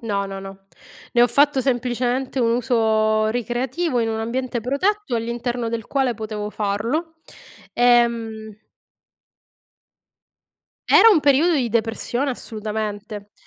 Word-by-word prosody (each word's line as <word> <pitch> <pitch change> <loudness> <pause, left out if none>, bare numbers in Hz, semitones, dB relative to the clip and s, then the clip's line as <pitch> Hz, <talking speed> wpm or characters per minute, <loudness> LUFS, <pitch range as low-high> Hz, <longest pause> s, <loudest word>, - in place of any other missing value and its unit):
No, 200 -4 -2
no, 195 0 -6
no. 195 0 -11 0.5
Ne 240 - +5
ho - - +6
fatto 285 +1 +3
semplicemente 250 +1 -1
un 230 -2 +2
uso 220 -3 +1
ricreativo, 245 +6 -2
in 225 - 0
un 220 0 -2
ambiente 240 +1 -3
protetto, 285 - -1
all'interno 235 +1 -3
del 225 -1 -4
quale 265 -3 0
potevo 215 -1 -5
farlo. 230 +12 -2 0.6
Ehm 230 -3 +1 2.3
era 455 - +8
un 360 -7 +4
periodo 290 +4 +3
di 265 -7 +1
depressione, 230 +4 -1
assolutamente, 210 -2 -6
235 Hz, 115 wpm, -21 LUFS, 220-260 Hz, 2.3 s, era